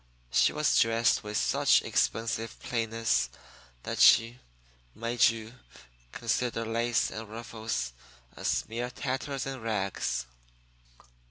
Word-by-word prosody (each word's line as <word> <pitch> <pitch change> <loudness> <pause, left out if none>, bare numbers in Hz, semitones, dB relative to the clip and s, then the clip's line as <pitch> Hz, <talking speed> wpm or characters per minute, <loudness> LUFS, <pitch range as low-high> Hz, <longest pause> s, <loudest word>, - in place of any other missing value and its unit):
She - - +4
was 150 -1 +2
dressed 115 0 +3
with 105 0 -3
such - - +3
expensive 115 0 -1
plainness 115 -1 0 0.5
that - - -4
she 115 +2 +6 0.6
made 115 +1 0
you 115 0 -6 0.6
consider 115 0 -1
lace 115 +1 0
and 110 -1 -7
ruffles 110 - -4 0.4
as - - -1
mere 120 +2 -3
tatters 135 +1 -3
and 135 -2 -5
rags. 95 - -2
115 Hz, 105 wpm, -29 LUFS, 110-120 Hz, 0.6 s, she